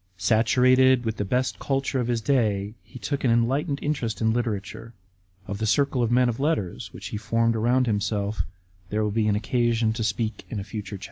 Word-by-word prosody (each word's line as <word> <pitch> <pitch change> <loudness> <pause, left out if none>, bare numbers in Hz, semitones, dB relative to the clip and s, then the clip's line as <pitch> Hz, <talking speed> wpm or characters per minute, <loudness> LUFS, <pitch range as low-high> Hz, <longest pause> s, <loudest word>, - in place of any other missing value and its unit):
* 95 - -40
Saturated 130 +3 +4
with 110 -1 -2
the - - -1
best 125 +6 -1
culture 135 -1 -1
of 120 - -1
his 120 -2 0
day, 105 -5 +1
he - - -13
took 140 +2 -3
an 130 - +3
enlightened 130 +6 +1
interest 135 -7 -2
in 110 -1 +2
literature. 115 -1 -4 0.5
Of 100 +1 -5
the 110 - -1
circle 140 +2 +2
of 115 - +1
men 125 +1 +4
of 120 0 -2
letters 140 - -1
which - - -8
he - - -4
formed 115 +1 +1
around 120 +3 +2
himself 105 -2 -1 0.5
there 105 +2 0
will 105 - 0
be 110 0 +1
an 105 - +2
occasion 115 -1 +1
to 110 0 -3
speak 110 0 -2
in 110 - -4
a - - -4
future 105 0 -6
chapter. - - -17
115 Hz, 210 wpm, -25 LUFS, 105-125 Hz, 0.5 s, Saturated